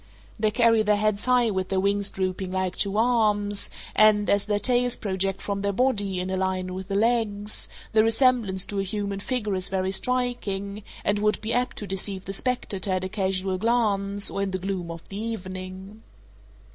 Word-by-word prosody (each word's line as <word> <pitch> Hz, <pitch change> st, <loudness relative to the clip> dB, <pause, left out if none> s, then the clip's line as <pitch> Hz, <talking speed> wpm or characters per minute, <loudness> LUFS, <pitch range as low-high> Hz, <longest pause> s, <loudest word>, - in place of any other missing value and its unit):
They 215 Hz, 0 st, +3 dB
carry 230 Hz, 0 st, +4 dB
their 210 Hz, -1 st, +3 dB
heads 210 Hz, 0 st, 0 dB
high 250 Hz, -3 st, +3 dB
with 190 Hz, -1 st, -2 dB
their 190 Hz, -, +1 dB
wings 200 Hz, +1 st, +1 dB
drooping 185 Hz, 0 st, -2 dB
like 185 Hz, -1 st, -1 dB
two 200 Hz, 0 st, 0 dB
arms, 210 Hz, -3 st, +2 dB, 0.3 s
and, 215 Hz, -1 st, +5 dB
as 200 Hz, 0 st, +2 dB
their 205 Hz, -1 st, +1 dB
tails 245 Hz, +3 st, +2 dB
project 195 Hz, -2 st, -2 dB
from 200 Hz, -1 st, -2 dB
their 200 Hz, 0 st, 0 dB
body 205 Hz, -5 st, +1 dB
in 185 Hz, +1 st, -3 dB
a 190 Hz, -, -1 dB
line 185 Hz, -1 st, -1 dB
with 190 Hz, 0 st, -6 dB
the 195 Hz, -, -2 dB
legs, 215 Hz, -2 st, 0 dB, 0.2 s
the 215 Hz, -1 st, +5 dB
resemblance 225 Hz, -5 st, +3 dB
to 200 Hz, -, -3 dB
a -, -, +1 dB
human 200 Hz, 0 st, -3 dB
figure 215 Hz, -2 st, -2 dB
is 185 Hz, 0 st, -1 dB
very 190 Hz, 0 st, -1 dB
striking, 210 Hz, -4 st, -2 dB, 0.2 s
and 205 Hz, 0 st, +2 dB
would 210 Hz, 0 st, +1 dB
be 220 Hz, +2 st, -2 dB
apt 245 Hz, 0 st, 0 dB
to 210 Hz, -, -3 dB
deceive 195 Hz, 0 st, -2 dB
the 195 Hz, -, -5 dB
spectator 205 Hz, -4 st, -1 dB
at 185 Hz, 0 st, 0 dB
a 185 Hz, -, -3 dB
casual 190 Hz, -1 st, -1 dB
glance 205 Hz, -3 st, +1 dB
or 195 Hz, -, -2 dB
in 200 Hz, -, 0 dB
the 185 Hz, -, -2 dB
gloom 185 Hz, -2 st, -4 dB
of 165 Hz, 0 st, -8 dB
the 200 Hz, +2 st, -5 dB
evening. 190 Hz, -1 st, -6 dB
200 Hz, 195 wpm, -25 LUFS, 190-220 Hz, 0.3 s, and